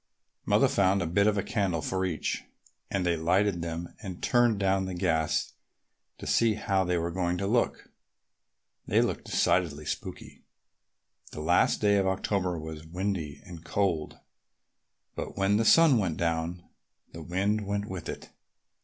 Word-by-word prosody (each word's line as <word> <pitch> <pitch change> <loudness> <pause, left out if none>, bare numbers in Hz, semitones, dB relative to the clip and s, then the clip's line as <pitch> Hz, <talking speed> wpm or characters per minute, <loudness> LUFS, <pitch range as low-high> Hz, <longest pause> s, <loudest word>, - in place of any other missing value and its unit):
Mother - - +4
found 95 -1 +2
a - - -2
bit 100 +5 +2
of 105 -2 +1
candle 90 -7 -1
for 95 +3 -1
each, 85 -4 -2 0.5
and 95 -2 -1
they 85 -1 +2
lighted 90 +3 +1
them 85 +1 -5
and 95 -4 -7
turned 120 -3 +3
down 95 -1 +1
the 95 -1 -4
gas 80 -4 0 0.6
to - - -9
see 115 -2 +3
how 95 -3 0
they 90 -1 0
were 85 0 -2
going 90 0 -1
to 100 - -2
look. 115 +4 0 1.0
They - - +3
looked - - 0
decidedly 80 -5 +1
spooky. - - -6 0.9
The - - -6
last - - +3
day 100 -1 +4
of 95 -1 +2
October 95 -1 -1
was 80 0 -7
windy 85 -5 -3
and 85 -2 -10
cold, 85 -5 -1 1.0
but - - -6
when 100 +1 +3
the 115 - +1
sun 155 -2 +6
went 90 -6 -1
down 85 +1 -1 0.5
the 85 - -9
wind 100 +5 -1
went 100 0 -1
with 95 -4 -6
it. - - -7
95 Hz, 155 wpm, -28 LUFS, 85-100 Hz, 1.0 s, sun